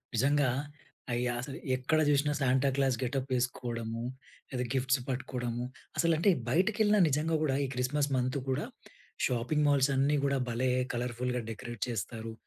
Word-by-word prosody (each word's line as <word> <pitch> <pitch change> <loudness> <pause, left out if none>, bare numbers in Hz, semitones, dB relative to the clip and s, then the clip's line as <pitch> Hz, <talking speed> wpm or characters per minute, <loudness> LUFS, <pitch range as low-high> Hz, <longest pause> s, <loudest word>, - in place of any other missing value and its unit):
నిజంగా! 140 +3 +3 0.6
అయ్య 120 +1 0
అసలు 135 +2 -6 0.2
ఎక్కడ 130 +5 +1
చూసినా 145 +1 +3
సాంటాక్లాస్ 135 0 +2
గెటప్ 135 +1 -2
వేసుకోవడము. 120 -2 -2 0.5
లేదా, 125 -2 -2
గిఫ్ట్స్ 130 0 +2
పట్టుకోవడము. 125 -2 -3 0.3
అసలు 170 +1 +3
అంటే 170 +6 +3 0.2
బయటికెళ్ళినా 210 - +3
నిజంగా 155 +3 +1
గూడా, 135 -3 +1
ఈ - - -2
క్రిస్మస్ 140 +3 0
మంత్ 130 +2 0
గూడా 130 - 0 0.6
షాపింగ్ 130 +5 +1
మాల్స్ 140 -1 +4
అన్నీ 140 +2 +3
గూడా 140 0 +2
భలే 120 +2 0 0.2
కలర్ఫుల్‍గా 125 +1 -2
డెకరేట్ 120 0 -7
చేస్తారు. 115 +1 -4
130 Hz, 135 wpm, -31 LUFS, 125-145 Hz, 0.6 s, మాల్స్